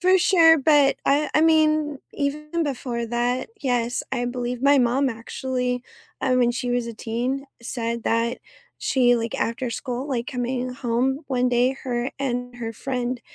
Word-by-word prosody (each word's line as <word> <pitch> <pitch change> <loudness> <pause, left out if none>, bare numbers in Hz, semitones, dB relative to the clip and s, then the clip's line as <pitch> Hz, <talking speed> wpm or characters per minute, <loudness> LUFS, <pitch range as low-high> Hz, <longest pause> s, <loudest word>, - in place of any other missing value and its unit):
For 370 +1 +5
sure, 330 -3 +6
but 290 -1 +4
I 290 +2 +2
I 305 - +5
mean, 310 -3 +3
even 300 +3 -2
before 245 -4 -3
that, 245 - -1
yes, 245 -3 0
I 245 -2 -1
believe 245 0 -3
my 285 +1 +6
mom 260 +2 +2
actually, 250 +1 -3 0.4
I 260 -1 +2
mean, 245 -1 +3
she 245 0 -3
was 245 -1 0
a - - -5
teen, 245 +5 -3 0.2
said 235 -1 -3
that 230 +2 0 0.4
she, 245 -2 +3
like, 230 -1 -2
after 235 +2 -2
school, 250 +3 -4
like, 245 -3 -2
coming 250 -1 -2
home 255 +2 0
one 250 -2 +1
day, 250 +2 +2
her 245 0 -1
and 245 -2 -3
her 230 -2 -4
friend 250 +1 -3
250 Hz, 160 wpm, -24 LUFS, 240-275 Hz, 0.4 s, sure